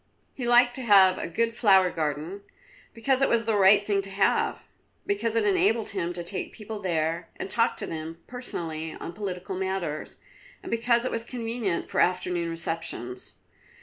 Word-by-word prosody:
He 245 Hz, -3 st, -4 dB
liked 245 Hz, 0 st, +5 dB
to -, -, -4 dB
have 195 Hz, -5 st, +6 dB
a -, -, -3 dB
good 230 Hz, +7 st, 0 dB
flower 190 Hz, -5 st, +4 dB
garden, 155 Hz, +5 st, -3 dB, 0.5 s
because 260 Hz, +3 st, 0 dB
it 275 Hz, -, +3 dB
was 230 Hz, -1 st, +2 dB
the 220 Hz, -1 st, +1 dB
right 200 Hz, +1 st, +6 dB
thing 200 Hz, -1 st, +1 dB
to 195 Hz, -, -6 dB
have, 195 Hz, 0 st, +1 dB, 0.4 s
because 215 Hz, +3 st, -1 dB
it 225 Hz, -2 st, +2 dB
enabled 210 Hz, +2 st, +2 dB
him 175 Hz, -3 st, -2 dB
to 175 Hz, 0 st, -3 dB
take 185 Hz, +3 st, -2 dB
people 215 Hz, -1 st, -7 dB
there 165 Hz, -2 st, -1 dB
and 190 Hz, -, -5 dB
talk 230 Hz, 0 st, +1 dB
to -, -, -2 dB
them 160 Hz, 0 st, -6 dB
personally 160 Hz, -10 st, -5 dB
on 170 Hz, -, -7 dB
political 190 Hz, -1 st, -5 dB
matters, 190 Hz, -5 st, -3 dB, 0.5 s
and -, -, -7 dB
because 235 Hz, +1 st, +2 dB
it -, -, -1 dB
was 230 Hz, -, -2 dB
convenient 230 Hz, -6 st, -3 dB
for -, -, -2 dB
afternoon 180 Hz, -1 st, +1 dB
receptions. 165 Hz, -9 st, -3 dB
195 Hz, 175 wpm, -26 LUFS, 170-230 Hz, 0.5 s, have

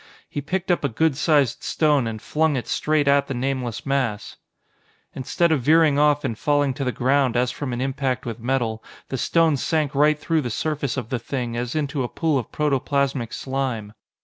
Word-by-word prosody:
He 145 Hz, -, -4 dB
picked 185 Hz, +5 st, -2 dB
up 175 Hz, -, +1 dB
a 140 Hz, -, +1 dB
good 155 Hz, +5 st, +1 dB
sized 145 Hz, -4 st, +2 dB
stone 150 Hz, -6 st, +1 dB
and 110 Hz, -1 st, -4 dB
flung 155 Hz, +6 st, 0 dB
it 125 Hz, -, -3 dB
straight 150 Hz, -2 st, +1 dB
at 140 Hz, 0 st, +4 dB
the 135 Hz, -, -3 dB
nameless 125 Hz, -2 st, -3 dB
mass! 130 Hz, -7 st, -2 dB, 0.8 s
Instead 165 Hz, +6 st, 0 dB
of 150 Hz, -4 st, +2 dB
veering 155 Hz, +1 st, +4 dB
off 150 Hz, 0 st, +3 dB
and 125 Hz, -5 st, -2 dB
falling 145 Hz, +2 st, +1 dB
to 140 Hz, +1 st, -4 dB
the 125 Hz, -, 0 dB
ground 130 Hz, -1 st, +1 dB
as 125 Hz, 0 st, +1 dB
from 140 Hz, 0 st, -5 dB
an 120 Hz, 0 st, -3 dB
impact 130 Hz, -1 st, -2 dB
with 115 Hz, -1 st, -5 dB
metal, 115 Hz, -2 st, -1 dB, 0.3 s
the 135 Hz, -, -2 dB
stone 165 Hz, 0 st, +3 dB
sank 155 Hz, 0 st, 0 dB
right 150 Hz, +2 st, +3 dB
through 160 Hz, +1 st, 0 dB
the 125 Hz, -, -3 dB
surface 140 Hz, +2 st, -2 dB
of 120 Hz, -4 st, -4 dB
the 125 Hz, -, -1 dB
Thing 120 Hz, -1 st, -4 dB
as 120 Hz, +2 st, -3 dB
into 145 Hz, -2 st, -1 dB
a 120 Hz, -, -2 dB
pool 155 Hz, -4 st, 0 dB
of 120 Hz, -, -7 dB
protoplastic 140 Hz, -4 st, 0 dB
slime. 130 Hz, -6 st, -3 dB
135 Hz, 200 wpm, -23 LUFS, 125-150 Hz, 0.8 s, at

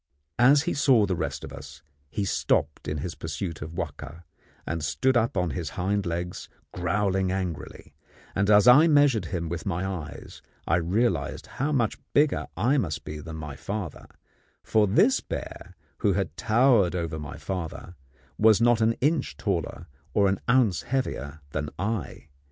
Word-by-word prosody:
As 140 Hz, +4 st, +6 dB
he -, -, -1 dB
saw 135 Hz, -7 st, +4 dB
the 95 Hz, -, -1 dB
rest -, -, -3 dB
of -, -, -8 dB
us, 70 Hz, 0 st, -11 dB, 0.3 s
he 105 Hz, +4 st, -2 dB
stopped 75 Hz, -5 st, 0 dB
in 75 Hz, +1 st, -2 dB
his 85 Hz, -, -4 dB
pursuit 80 Hz, +1 st, -5 dB
of 80 Hz, +3 st, -7 dB
Wahka, 85 Hz, 0 st, -6 dB, 0.4 s
and 85 Hz, -1 st, -3 dB
stood 130 Hz, +12 st, +1 dB
up 115 Hz, 0 st, +1 dB
on 90 Hz, -2 st, +1 dB
his 85 Hz, -5 st, -4 dB
hind 100 Hz, +1 st, 0 dB
legs 85 Hz, +1 st, -4 dB, 0.2 s
growling 95 Hz, +1 st, 0 dB
angrily; 90 Hz, -4 st, -5 dB, 0.4 s
and 100 Hz, +1 st, +1 dB
as 105 Hz, +2 st, +6 dB
I 140 Hz, +7 st, +8 dB
measured 145 Hz, -7 st, +4 dB
him 85 Hz, -3 st, -3 dB
with 85 Hz, +4 st, -5 dB
my 90 Hz, 0 st, -1 dB
eyes 90 Hz, -7 st, -7 dB, 0.2 s
I 85 Hz, -, +2 dB
realized 90 Hz, -1 st, 0 dB
how 145 Hz, +4 st, -3 dB
much 120 Hz, -6 st, 0 dB
bigger 145 Hz, 0 st, +2 dB
I 125 Hz, +9 st, +2 dB
must 75 Hz, -, -3 dB
be 75 Hz, 0 st, -6 dB
than 80 Hz, +1 st, -8 dB
my 75 Hz, -3 st, -6 dB
father, 100 Hz, -4 st, -5 dB, 0.6 s
for 110 Hz, -1 st, +3 dB
this 215 Hz, -, +4 dB
bear, -, -, -7 dB, 0.2 s
who 100 Hz, -, +2 dB
had 100 Hz, +1 st, -2 dB
towered 115 Hz, -5 st, +3 dB
over 85 Hz, -2 st, -3 dB
my 75 Hz, -1 st, -7 dB
father, 85 Hz, -2 st, -5 dB, 0.5 s
was 110 Hz, -1 st, +6 dB
not 120 Hz, -1 st, +4 dB
an 110 Hz, +1 st, +3 dB
inch 150 Hz, +4 st, 0 dB
taller -, -, -2 dB, 0.3 s
or 100 Hz, -, +4 dB
an 95 Hz, 0 st, 0 dB
ounce 115 Hz, -7 st, +3 dB
heavier 80 Hz, -, -3 dB
than 75 Hz, 0 st, -3 dB
I. 100 Hz, -6 st, -4 dB
95 Hz, 165 wpm, -26 LUFS, 85-115 Hz, 0.6 s, I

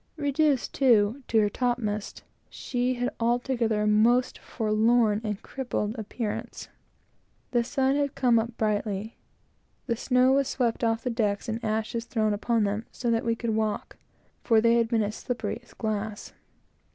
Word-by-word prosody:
Reduced, 285 Hz, -2 st, +1 dB
too, 235 Hz, -1 st, +3 dB
to 225 Hz, -, +1 dB
her 210 Hz, -, +3 dB
top 245 Hz, +3 st, 0 dB
masts, 210 Hz, -3 st, -4 dB, 0.3 s
she 250 Hz, 0 st, -2 dB
had 245 Hz, 0 st, -1 dB
altogether 235 Hz, -2 st, +1 dB
a -, -, +1 dB
most 230 Hz, +4 st, +3 dB
forlorn 220 Hz, -1 st, +2 dB
and 210 Hz, -2 st, -3 dB
crippled 245 Hz, -5 st, -3 dB
appearance. 220 Hz, -1 st, -5 dB, 0.8 s
The 240 Hz, -2 st, +2 dB
sun 265 Hz, +2 st, +1 dB
had 285 Hz, -1 st, -1 dB
come 245 Hz, -3 st, +3 dB
up 235 Hz, +1 st, -4 dB
brightly; 210 Hz, 0 st, -2 dB, 0.7 s
the 235 Hz, -, 0 dB
snow 250 Hz, +2 st, +3 dB
was 275 Hz, 0 st, +3 dB
swept 240 Hz, -4 st, -1 dB
off 225 Hz, 0 st, +1 dB
the 250 Hz, -, -1 dB
decks, 210 Hz, -3 st, -1 dB
and 230 Hz, +1 st, -3 dB
ashes 220 Hz, +1 st, -2 dB
thrown 215 Hz, -3 st, 0 dB
upon 225 Hz, +2 st, +1 dB
them, 205 Hz, +3 st, -2 dB
so 240 Hz, -1 st, -2 dB
that 230 Hz, 0 st, +1 dB
we 230 Hz, 0 st, 0 dB
could 230 Hz, 0 st, -2 dB
walk, 215 Hz, -1 st, -2 dB, 0.5 s
for 225 Hz, -2 st, +4 dB
they 230 Hz, +1 st, +4 dB
had 230 Hz, -1 st, +2 dB
been 225 Hz, -2 st, +1 dB
as 205 Hz, +1 st, -3 dB
slippery 245 Hz, -1 st, -3 dB
as 240 Hz, -, -21 dB
glass. 215 Hz, -1 st, -4 dB
230 Hz, 165 wpm, -27 LUFS, 215-245 Hz, 0.8 s, for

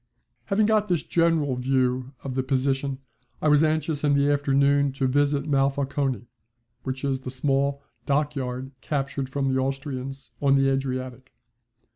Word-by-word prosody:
Having 210 Hz, +1 st, +2 dB
got 215 Hz, -1 st, +2 dB
this 175 Hz, -4 st, 0 dB
general 165 Hz, -5 st, +2 dB
view 130 Hz, 0 st, 0 dB
of 135 Hz, -, -4 dB
the 130 Hz, -, 0 dB
position 135 Hz, +1 st, 0 dB, 0.4 s
I -, -, 0 dB
was 150 Hz, +1 st, +5 dB
anxious 155 Hz, -1 st, 0 dB
in 145 Hz, -1 st, +3 dB
the 140 Hz, +1 st, +3 dB
afternoon 140 Hz, 0 st, +2 dB
to 135 Hz, 0 st, -1 dB
visit 145 Hz, +1 st, +1 dB
Monfalcone, 135 Hz, -3 st, 0 dB, 0.6 s
which 130 Hz, 0 st, -5 dB
is 135 Hz, -1 st, 0 dB
the 130 Hz, -, -7 dB
small 140 Hz, +1 st, 0 dB, 0.2 s
dockyard 135 Hz, -3 st, -1 dB
captured 140 Hz, -2 st, -2 dB
from 135 Hz, 0 st, 0 dB
the 130 Hz, -, +2 dB
Austrians 135 Hz, -1 st, -4 dB
on 140 Hz, -1 st, +4 dB
the 135 Hz, 0 st, +3 dB
Adriatic. 130 Hz, -1 st, -3 dB
135 Hz, 145 wpm, -25 LUFS, 130-145 Hz, 0.6 s, was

